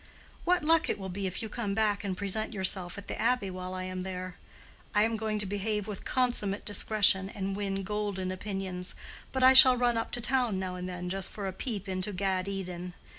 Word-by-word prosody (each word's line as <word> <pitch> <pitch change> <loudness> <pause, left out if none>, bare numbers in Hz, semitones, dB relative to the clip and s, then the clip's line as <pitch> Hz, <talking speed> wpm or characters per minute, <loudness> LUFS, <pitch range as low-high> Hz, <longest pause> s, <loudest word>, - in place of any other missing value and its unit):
What 355 -2 +3
luck 325 +1 +4
it - - 0
will 190 -1 -6
be 195 +1 -3
if 185 - -4
you - - -3
come 210 -2 -3
back 210 -1 +1
and 190 -2 -3
present 215 +3 -1
yourself 190 -2 0
at 200 - -8
the - - -4
Abbey 230 -4 +1
while 185 0 -6
I 185 - -4
am 185 0 -4
there! 185 -1 -5 0.6
I 210 - +5
am 225 +1 +1
going 215 -1 -2
to 210 - 0
behave 205 +1 -2
with 210 -2 -6
consummate 240 -6 +1
discretion 205 -2 +4
and 195 -1 -4
win 195 -1 -2
golden 200 -2 -2
opinions, 185 -1 -3 0.4
But 260 -1 0
I 260 +1 +9
shall 260 -1 +9
run 240 -1 +2
up 225 - -2
to 245 - -1
town 245 -4 +1
now 185 -1 -3
and 180 0 -5
then, 180 0 -5
just 190 +1 -2
for 205 - -6
a 190 - -3
peep 205 -1 -4
into 185 +2 -2
Gad 190 0 -1
Eden. 180 -2 -5
200 Hz, 220 wpm, -30 LUFS, 185-220 Hz, 0.6 s, I